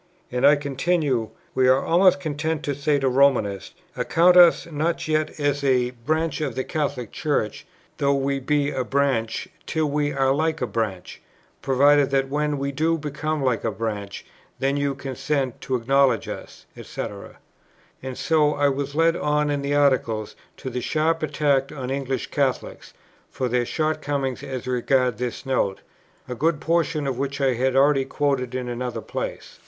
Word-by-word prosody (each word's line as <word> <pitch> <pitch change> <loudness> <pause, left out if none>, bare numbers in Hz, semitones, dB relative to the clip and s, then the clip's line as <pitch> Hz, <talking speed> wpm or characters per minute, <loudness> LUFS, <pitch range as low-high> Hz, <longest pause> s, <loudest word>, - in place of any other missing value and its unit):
And 125 +2 +3
I 145 - +7
continue, 140 -4 0 0.2
"We 130 -1 +3
are 130 +1 +4
almost 185 +2 +4
content 155 -1 -2
to 145 - -1
say 145 +1 +1
to 135 -1 0
Romanists, 125 -7 +2 0.2
account 175 +2 +3
us 175 -2 +7
not 160 +1 -2
yet 155 0 -1
as 145 -1 0
a 125 -2 +2
branch 155 +7 -2
of 135 -6 -2
the 130 - -1
Catholic 140 -7 -3
Church, 145 -9 -2 0.3
though 140 0 +2
we 140 0 0
be 145 +1 0
a 130 - -1
branch, 135 -1 0 0.2
till 160 -1 0
we 145 0 0
are 135 -1 +2
like 160 +2 0
a 125 - 0
branch, 105 -6 -4 0.4
provided 140 +1 +4
that 135 -1 +1
when 150 +1 -1
we 140 0 -2
do 160 +4 +1
become 150 0 -3
like 125 -5 0
a 115 - +1
branch, 105 -2 -5 0.3
then 135 +1 0
you 140 -1 -1
consent 135 -1 -3
to 130 - -2
acknowledge 130 -1 +2
us," - - -8
&c. - - -6 1.0
And 130 -1 -6
so 150 -2 +2
I 145 0 +3
was 140 +1 -3
led 165 +1 +3
on 150 -1 0
in 145 -1 -1
the 140 +1 -1
Article 125 -7 +2 0.3
to 130 - -6
that 125 - -3
sharp 160 +5 0
attack 145 -3 +1
on 130 -3 -5
English 135 -2 -3
Catholics, 135 -3 -2 0.3
for 130 - -2
their 120 0 0
shortcomings 145 -5 -1
as 130 -3 -6
regards 125 -1 +1
this 125 +1 -4
Note, 125 -7 0 0.5
a 125 - -4
good 150 +5 0
portion 165 -2 0
of 130 -2 -2
which 140 0 -3
I 135 -2 +2
have 130 +2 0
already 135 0 +4
quoted 135 -3 -1
in 125 -1 -3
another 120 -1 -4
place. - - -6
140 Hz, 170 wpm, -23 LUFS, 130-150 Hz, 1.0 s, I